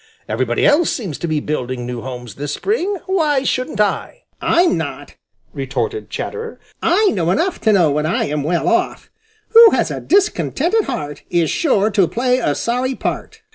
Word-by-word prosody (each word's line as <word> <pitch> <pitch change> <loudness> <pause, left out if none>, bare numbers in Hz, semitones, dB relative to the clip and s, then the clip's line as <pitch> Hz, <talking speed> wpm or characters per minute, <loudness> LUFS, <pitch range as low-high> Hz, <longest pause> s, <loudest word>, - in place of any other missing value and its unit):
Everybody 120 +2 0
else 310 +3 +4
seems 190 - -4
to 170 - -3
be 155 -2 0
building 130 -4 -3
new 120 -1 -5
homes 125 -3 -7
this 145 +1 -4
spring; 405 -1 -1
why 310 -8 +1
shouldn't 255 -5 -2
I?" 210 - -1 0.2
"I'm 345 0 +3
not!" - - -5 0.4
retorted 430 -1 -3
Chatterer. 455 0 -5 0.2
"I 400 +5 +3
know 170 -3 -1
enough 330 - 0
to 220 - +3
know 175 -7 +4
when 150 +2 0
I 170 - 0
am 150 0 -2
well 165 +4 -1
off. - - 0 0.4
"Who 460 0 +9
has - - +1
a - - -4
discontented 395 0 +1
heart 145 -1 -5
Is 170 -3 +1
sure 220 -9 +2
to 195 -4 +3
play 250 - +1
a - - 0
sorry 250 +2 -1
part." - - -5
220 Hz, 175 wpm, -18 LUFS, -, 0.4 s, Who